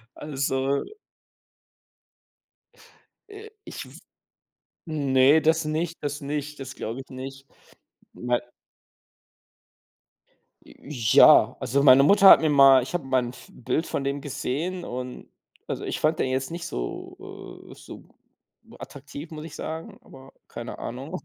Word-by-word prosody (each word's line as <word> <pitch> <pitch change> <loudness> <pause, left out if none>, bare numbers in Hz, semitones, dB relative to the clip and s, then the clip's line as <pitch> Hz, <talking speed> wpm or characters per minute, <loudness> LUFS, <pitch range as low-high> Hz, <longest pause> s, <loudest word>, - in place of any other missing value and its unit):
Also 135 -1 -2 2.5
Äh, 415 +2 -11
ich - - -8
w - - -14 0.9
ne, 140 -1 +3
das 160 +1 +2
nicht 160 +2 -2
das 145 0 -4
nicht. 150 0 -5
Das 135 -1 -7
glaube 115 +4 -6
ich 135 - -11
nicht. 135 +1 -9 0.7
Mei 125 0 -1 2.2
J 115 - -4
ja, - - +7
also, 140 +3 0
meine 135 -1 +7
Mutter 200 +6 +6
hat - - +9
mir 160 - +1
mal 135 -2 +7
ich 130 - -8
habe 175 -5 -2
mal 130 -1 +1
'n 120 - -5
f 125 - -15
Bild 155 +6 -2
von 140 - -3
dem 140 +1 -2
gesehen 155 +6 -4
und 125 -2 -7 0.4
also, - - -5
ich - - -3
fand 155 +1 +1
den - - 0
jetzt 130 +1 -2
nicht 170 0 -6
so, - - -6 0.5
äh - - -11
so - - -12 0.8
attraktiv, 145 +2 -10
muss 155 -1 -8
ich 165 - -10
sagen, 160 +1 -7
aber 135 0 -15 0.2
keine 120 0 -8
Ahnung. 135 +9 -6
140 Hz, 135 wpm, -25 LUFS, 130-155 Hz, 2.5 s, hat